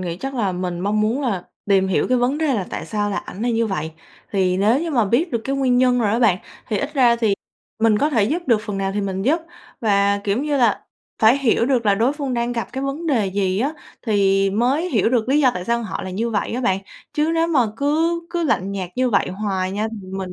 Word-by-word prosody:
nghĩ 175 -2 -4
chắc 270 +8 -5
là 210 -7 0
mình 180 -1 -3
mong 210 +2 0
muốn 225 +7 0
là 200 -9 -1 0.3
tìm 190 -1 +3
hiểu 190 - +1
cái 255 0 +3
vấn 255 +4 +1
đề 310 -4 +1
là 195 -5 -2
tại - - -5
sao 205 -1 -1
là 200 - -2
ảnh 205 - -6
lại 240 - +1
như 230 0 +1
vậy, 160 -6 -3 0.4
thì 185 -2 +1
nếu 220 +8 +3
như 335 - -3
mà 245 -7 +2
biết 260 - +1
được 235 - 0
cái 275 +1 -1
nguyên 255 -2 +2
nhân 250 -1 +3
rồi 215 -3 +1
á 225 - +1
bạn, 210 -7 +3 0.3
thì 210 - 0
ít 290 +2 -4
ra 245 -4 +4
thì 220 -4 +1 0.5
mình 220 -2 +4
có 295 - +1
thể 225 -8 +2
giúp 330 +10 -1
được 230 -4 +3
phần 205 -2 -3
nào 195 0 -1
thì 205 - 0
mình 195 -1 -3
giúp. 305 - +2 0.4
Và, 200 -2 +2
kiểu 205 +2 0
như 295 -1 0
là, 235 -5 +2 0.4
phải 225 +5 +6
hiểu 240 -3 +2
được 250 -5 +1
là 200 - +5
đối 235 +7 +2
phương 280 -4 -3
đang 235 0 -1
gặp 235 -1 -3
cái 265 +1 -4
vấn 285 +5 -4
đề 235 -9 +2
gì 190 -1 0
á, 280 +5 0 0.3
thì 195 -2 +3
mới 255 - +1
hiểu 225 -4 +2
được 240 -1 0
lý 285 +3 +3
do 260 -3 +5
tại 180 - -4
sao 235 +2 0
họ 220 - -5
là 190 - -5
như 225 +5 -2
vậy 215 - -1
á 245 - -2
bạn. 195 -6 +1 0.3
Chứ 305 +1 +1
nếu 330 0 +2
mà 320 -6 +2 0.2
cứ 320 +5 +1
cứ 345 -1 -1
lạnh 200 - 0
nhạt 185 -3 -4
như 255 0 +1
vậy 200 - +2
hoài 190 -1 -2
nha, 210 +2 -1
thì 205 -4 -9
mình 185 -1 -5
225 Hz, 265 wpm, -21 LUFS, 200-265 Hz, 0.5 s, phải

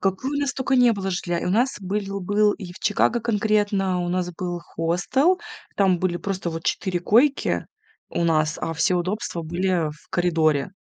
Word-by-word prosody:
Какой 195 +8 -1
у 285 0 -1
нас 280 -1 -1
только 265 0 0
не 245 -2 +6
было 195 -2 -3
жилья, 175 -1 -2
у - - 0
нас 240 +7 +2
были 195 +1 -3
был 205 +2 +2
и 180 -4 -8
в - - -13
Чикаго 230 +3 +1
конкретно, 205 -4 +1
у 175 - -2
нас 180 0 -1
был 175 0 -4
хостел, 180 - +1 0.4
там 190 -3 +3
были 175 0 0
просто 185 0 -3
вот 165 0 -5
4 185 -2 -1
койки 255 +10 +2 0.4
у - - -1
нас, 155 -1 +1
а 165 - -2
все 180 +4 +2
удобства 180 0 -2
были 175 -1 0
в 150 - -16
коридоре. 160 -3 +1
185 Hz, 185 wpm, -23 LUFS, 175-210 Hz, 0.4 s, не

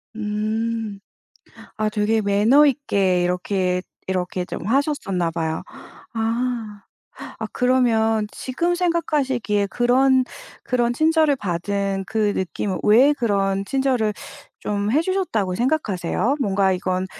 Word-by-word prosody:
음 215 0 -2 0.8
아 215 -1 0
되게 215 +1 +1
매너 210 +9 +4
있게 200 -11 +1
이렇게 180 0 0 0.3
이렇게 185 -1 -2
좀 175 - -6
하셨었나 220 - 0
봐요. 160 -1 -3 0.5
아 230 -1 -2 0.6
아 - - -4
그러면 225 -4 +2
지금 340 +7 -1
생각하시기에 285 - 0
그런 255 +4 +3 0.4
그런 240 -1 0
친절을 315 0 +3
받은 195 0 -2
그 215 -1 0
느낌은 190 +1 -2
왜 250 +8 +6
그런 195 -6 0
친절을 255 -4 0 0.4
좀 205 0 -2
해 295 +7 +3
주셨다고 335 - -1
생각하세요? 235 - 0
뭔가 195 -4 +2
이건 185 0 -1
220 Hz, 235 characters per minute, -22 LUFS, 195-260 Hz, 0.8 s, 왜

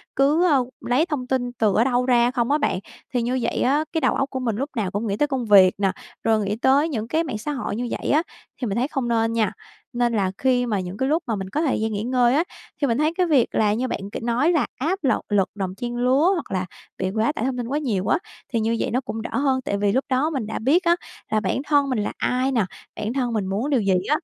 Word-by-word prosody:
cứ, 295 +6 +3
a, 290 -4 +4 0.2
lấy 255 +7 +2
thông 290 -7 -3
tin 250 -2 -1
từ 215 -4 +1
ở 225 - +4
đâu 250 -1 +1
ra 245 -1 +4
không 245 0 0
á 295 - +4
bạn. 290 - 0 0.3
Thì 245 - +1
như 250 +2 0
vậy - - -1
á, 285 +5 +2
cái 320 - 0
đầu 260 - +2
óc 275 0 0
của 260 - -4
mình 235 -4 -1
lúc 275 +7 -3
nào 205 -6 -1
cũng 210 +3 -2
nghĩ 200 - -1
tới 295 - +2
công 265 -4 -2
việc 195 -3 +7
nè, 195 -1 +1 0.3
rồi 220 -1 +3
nghĩ 205 - -1
tới 275 +7 +3
những 225 -6 -3
cái 320 +4 +1
mạng 255 -9 -4
xã 295 +8 -4
hội 265 -7 -3
như 240 +2 -2
vậy - - -4
á, 310 +3 +3 0.4
thì 245 - -1
mình 200 +1 -2
thấy 255 +3 +1
không 270 -5 -2
nên 225 -1 +1
nha. 220 -3 +1 0.4
Nên 240 -1 +1
là 195 -4 +1
khi 250 -1 +2
mà 215 -4 0
những 185 +2 -5
cái 265 +1 0
lúc 330 +2 +1
mà 225 - 0
mình 190 -1 -5
có 300 - -1
thời 295 -5 +1
gian 220 0 0
nghỉ 205 0 -2
ngơi 245 +1 +3
á, 320 - +3 0.4
thì 280 - +3
mình 230 +1 +1
thấy 310 +2 +1
cái 365 +1 +1
việc 280 -7 +4
là 210 -1 +3
như 250 +4 -1
bạn 200 -3 -4
kể - - -4
nói 245 +8 +2
là 325 -4 +2
áp 340 +9 -1
lật 265 - +2
lực 200 -3 +2
đồng 190 -2 -3
trang 240 +3 -4
lứa 265 +8 +3
hoặc 345 - -4
là 185 -1 -1 0.3
bị 190 0 -1
quá 220 +5 +1
tải 225 - -1
thông 260 -1 -1
tin 240 - -3
quá 280 +4 -1
nhiều 215 -11 -1
á, - - +3 0.4
thì 230 - +2
như 225 +1 +1
vậy - - -1
nó 250 +3 +1
cũng 225 -3 -5
đỡ - - -5
hơn. 270 -2 +2
Tại 200 - -1
vì 200 0 +1
lúc 260 +6 0
đó 265 +4 +2
mình 265 -9 -3
đã 220 - -3
biết 310 +11 +3
á 340 0 +4 0.4
là 215 - +3
bản 215 +5 -1
thân 285 -2 +3
mình 250 -5 0
là 205 - -2
ai 255 +2 0
nà, 230 -6 +2 0.3
bản 215 +2 -3
thân 250 -3 -1
mình 205 -3 -1
muốn 205 +9 -2
điều 265 -5 +2
gì 195 -2 +2 0.2
á, 300 - +4
245 Hz, 290 wpm, -23 LUFS, 220-275 Hz, 0.4 s, việc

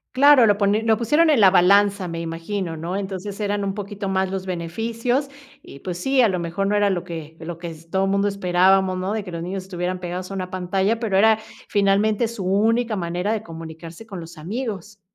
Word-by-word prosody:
Claro 275 -2 +7
lo 205 -2 +3
poni 205 +1 +2
lo 225 -1 +2
pusieron 295 +8 +3
en 290 - +4
la 195 -3 +8
balanza 195 0 +4
me 165 0 -4
imagino, 165 +2 -4
¿no? 170 +4 -4
Entonces, 195 +1 -5
eran 205 -1 -1
un 195 -1 -2
poquito 200 -1 -5
más 190 0 0
los 190 0 -4
beneficios, 230 - -2 0.3
y 140 - -12
pues 180 +1 -5
sí 270 +6 +1
a 235 - +5
lo 185 -3 -1
mejor 175 +3 -2
no 210 - +1
era 205 -1 +3
lo 180 -2 -2
que 160 -2 -8
lo 165 0 -6
que 170 0 -6
s 165 +1 -13
todo 190 +2 +1
mundo 200 +1 +1
esperábamos, 190 -1 +2
¿no? 185 +3 -2
De 215 -2 -2
que 180 - -8
los 170 - -5
niños 185 +2 -4
estuvieran 180 -1 -3
pegados 180 +1 -5
a - - -6
una 185 -1 -4
pantalla, 190 +4 0
pero 220 -5 -1
era 220 +1 +5 0.3
finalmente 205 +2 +2
su 225 -4 -6
única 220 +3 +1
manera 175 +4 -2
de 220 - -1
comunicarse 165 +2 -10
con 195 -5 -8
los 165 0 -10
amigos. 210 +2 -5
195 Hz, 220 wpm, -22 LUFS, 175-210 Hz, 0.3 s, la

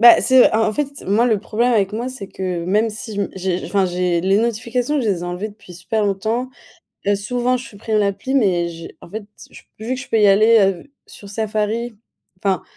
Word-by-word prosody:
Bah, 235 0 +9
c'est, 260 -1 +5
en 220 0 +3
en - - -2
fait, 295 +4 -1 0.2
moi, 210 +5 +3
le 220 -4 +2
problème 235 +5 0
avec 200 -3 +2
moi, 235 +4 -3
c'est 255 -6 -7
que 185 -3 -4
même 210 +5 +2
si 215 +1 -7
je 200 - -2
me - - -3
j'ai, 185 -1 -2
enfin, 195 -2 +1
j'ai 180 -1 0
les 190 +3 +2
notifications, 235 +5 -1
je 230 - -1
les 195 -4 +1
ai - - -7
enlevées 175 +4 -4
depuis 205 -3 -15
super 180 +5 -1
longtemps. 220 +6 -1 0.6
Heu, 205 - +4
souvent, 245 +5 0
je 250 - -8
supprime 215 0 -3
l'appli, 200 +6 -1
mais 185 -10 +2
j'ai, 165 0 -10
en - - -13
fait, 215 +3 -6 0.3
j - - -13 0.2
vu 225 +4 -3
que 260 - -6
je 265 - -12
peux 225 - +2
y 210 - +5
aller, 215 +4 +6
heu, 195 +6 0
sur 200 - -13
Safari 220 +2 -2 0.5
enfin, 190 -3 +1
210 Hz, 225 wpm, -20 LUFS, 195-235 Hz, 0.6 s, Bah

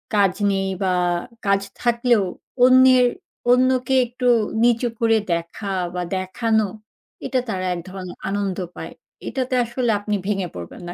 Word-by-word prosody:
কাজ 195 -3 +4 0.2
নেই। 195 0 0 0.2
বা 185 -1 +1 0.5
কাজ 200 0 +3 0.2
থাকলেও 235 -3 +2 0.4
অন্যের 255 -1 +6 0.5
অন্যকে 255 +1 +3
একটু 250 +1 -3 0.4
নিচু 240 0 +3
করে 225 -1 +3 0.2
দেখা 170 +4 -4 0.2
বা 180 - -1 0.2
দেখানো। 220 +3 0 0.6
এটা 260 - 0
তারা 185 -2 -2
এক - - -5
ধরনের 185 -1 -8
আনন্দ 195 -2 -2 0.2
পায়। - - -7 0.3
এটাতে 255 -1 -2
আসলে 235 0 -1
আপনি 210 0 -2
ভেঙে 195 -3 -1
পড়বেন 85 - -8
না। - - -5
220 Hz, 135 wpm, -22 LUFS, 195-250 Hz, 0.6 s, অন্যের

